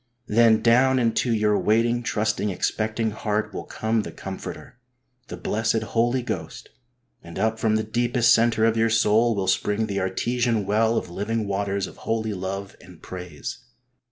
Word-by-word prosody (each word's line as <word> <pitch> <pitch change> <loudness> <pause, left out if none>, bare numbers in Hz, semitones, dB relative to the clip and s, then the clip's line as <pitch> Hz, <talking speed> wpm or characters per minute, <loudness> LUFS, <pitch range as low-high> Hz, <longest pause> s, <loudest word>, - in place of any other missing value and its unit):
Then 115 0 +4
down 130 +3 +4
into 120 0 +1
your 105 -2 +2
waiting, 115 +2 +2
trusting, 105 -2 -1
expecting 110 +3 -1
heart 105 0 -2
will - - -5
come 110 0 -1
the - - -7
Comforter, 95 +5 -8 0.5
the - - -7
blessed 110 +1 0
Holy 120 +3 0
Ghost, - - -6 0.5
and 85 -1 -10
up 110 0 0
from 110 -1 +2
the 110 - +1
deepest 120 +2 +2
centre 115 -1 +3
of 115 0 +2
your 115 0 +2
soul 115 +1 +3
will 100 -1 -1
spring 105 +3 +1
the 100 -2 -2
artesian 115 +3 0
well 110 +3 +2
of 85 - -3
living 105 +4 -2
waters 100 0 -1
of - - -11
holy 110 -1 -2
love 95 +1 -5
and 90 -2 -16
praise. 90 -4 -7
110 Hz, 160 wpm, -24 LUFS, 100-115 Hz, 0.5 s, Then